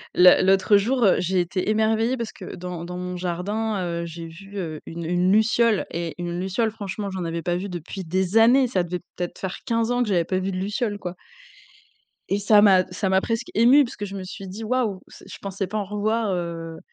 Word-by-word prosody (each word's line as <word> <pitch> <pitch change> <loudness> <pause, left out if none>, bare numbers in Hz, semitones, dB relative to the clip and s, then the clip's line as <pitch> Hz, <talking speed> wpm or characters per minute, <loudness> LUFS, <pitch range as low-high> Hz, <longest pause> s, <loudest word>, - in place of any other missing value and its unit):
Le 180 0 +7
l'autre 195 +2 +5
jour, 240 +4 +1
heu, 190 - +5
j'ai 185 +1 +1
été 180 +3 -1
émerveillée 220 +3 +2
parce 230 -2 -4
que 185 - -9
dans 180 -1 -6
dans 180 +1 -6
mon 180 0 -4
jardin, 195 +4 -2 0.2
heu, - - -4
j'ai 165 0 -7
vu, 195 +5 -11
heu, 160 -5 -4
une 170 0 -6
une 180 +2 +2
luciole 220 0 +3
et 170 -1 -4
une 175 0 -4
luciole, 200 +4 0
franchement, 200 -1 -5
j'en 185 -2 -4
avais 165 0 -3
pas 175 -1 0
vu 200 +2 -5
depuis 180 +2 -6
des 185 +4 0
années. 250 +3 +6
Ça 185 -6 0
devait 175 +1 -4 0.2
peut-être 175 -1 -4
faire 190 -1 -4
15 230 0 0
ans 245 0 +1
que 215 - -3
j'avais 175 -4 +2
pas 185 +2 -1
vu 190 +1 -2
de 185 - -4
luciole 205 +2 -2
quoi 180 -2 -6 1.1
et 200 - +1
ça 205 +1 +5
m'a 190 -3 +6
ça 190 +1 -1
m'a 190 0 +3
presque 230 +1 -2
émue 250 +6 +6
parce 255 0 -6
que 205 - -4
je 200 0 -7
me 190 - -5
suis 195 +1 -8
dit: 200 +5 -7
«Waouh, 220 -4 -1
se - - -14
je - - -9
pensais 195 -1 -4
pas 215 - -4
en 205 - -1
revoir 210 +1 -1
heu», 165 -2 -4
195 Hz, 230 wpm, -24 LUFS, 180-220 Hz, 1.1 s, Le